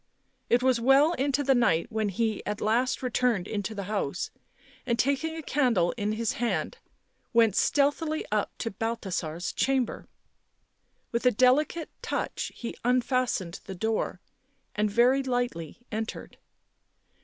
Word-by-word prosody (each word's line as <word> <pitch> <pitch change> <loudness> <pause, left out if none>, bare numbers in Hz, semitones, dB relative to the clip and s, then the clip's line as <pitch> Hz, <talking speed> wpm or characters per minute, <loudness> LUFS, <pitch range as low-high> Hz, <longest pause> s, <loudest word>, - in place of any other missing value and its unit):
It 245 +1 +3
was 255 -3 +3
well 275 +6 +5
into 285 -2 0
the 275 0 +4
night 235 -4 +2
when 220 -1 0
he 215 +2 -1
at 210 0 -3
last 240 +5 +1
returned 245 -6 +1
into 210 +1 -3
the 200 - -4
house, 190 -5 -2 0.5
and, 235 -2 0
taking 280 +5 0
a 320 - -6
candle 245 -13 +2
in 210 -2 -1
his 225 0 0
hand, 240 - -2 0.5
went 225 -4 +4
stealthily 305 +2 +1
up 210 -1 +1
to 230 - -3
Balthasar's 190 -7 -3
chamber. 265 -3 0 1.0
With 235 +2 +1
a - - +6
delicate 270 +8 +2
touch - - -3
he 235 - -6
unfastened 245 -7 0
the 190 - -6
door, 220 +4 -1 0.5
and 210 0 +1
very 245 +6 +4
lightly 245 - -2
entered. 220 +1 -5
235 Hz, 135 wpm, -28 LUFS, 210-260 Hz, 1.0 s, a